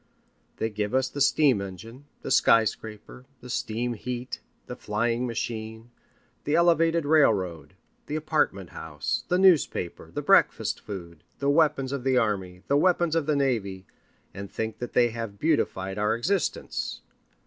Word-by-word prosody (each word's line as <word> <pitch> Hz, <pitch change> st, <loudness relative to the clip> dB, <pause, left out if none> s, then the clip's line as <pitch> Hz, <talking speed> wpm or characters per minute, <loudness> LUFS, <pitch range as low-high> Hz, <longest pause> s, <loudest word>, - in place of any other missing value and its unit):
They 110 Hz, -, -2 dB
give 105 Hz, +2 st, -2 dB
us 130 Hz, 0 st, +2 dB
the 145 Hz, -, -6 dB
steam 135 Hz, -6 st, +4 dB
engine, 110 Hz, +8 st, -9 dB, 0.2 s
the -, -, -4 dB
skyscraper, 110 Hz, +2 st, +1 dB, 0.2 s
the 125 Hz, -, -8 dB
steam 120 Hz, +1 st, -2 dB
heat, 125 Hz, +2 st, -5 dB, 0.3 s
the 125 Hz, -, -7 dB
flying 115 Hz, +2 st, -1 dB
machine, 110 Hz, 0 st, -5 dB, 0.5 s
the 145 Hz, -, 0 dB
elevated 165 Hz, -1 st, +3 dB
railroad, 105 Hz, -, +2 dB, 0.3 s
the 150 Hz, -, -3 dB
apartment 150 Hz, -, -1 dB
house, 75 Hz, -3 st, -4 dB
the 180 Hz, -, +2 dB
newspaper, 180 Hz, -, +2 dB
the -, -, -5 dB
breakfast -, -, +3 dB
food, 85 Hz, -6 st, -9 dB
the 140 Hz, 0 st, +1 dB
weapons 145 Hz, -4 st, +2 dB
of 140 Hz, -3 st, -3 dB
the 130 Hz, -1 st, +2 dB
army, 95 Hz, -5 st, -1 dB
the 140 Hz, -, +3 dB
weapons 175 Hz, 0 st, +2 dB
of 160 Hz, -3 st, 0 dB
the 150 Hz, -, +2 dB
navy, 105 Hz, -9 st, -1 dB, 0.5 s
and 100 Hz, 0 st, -7 dB
think 110 Hz, -1 st, -4 dB
that 120 Hz, -, -6 dB
they 120 Hz, -1 st, +4 dB
have 115 Hz, -3 st, -6 dB
beautified 100 Hz, -10 st, 0 dB
our 105 Hz, +2 st, +1 dB
existence. 185 Hz, +11 st, -2 dB
120 Hz, 150 wpm, -26 LUFS, 105-145 Hz, 0.5 s, steam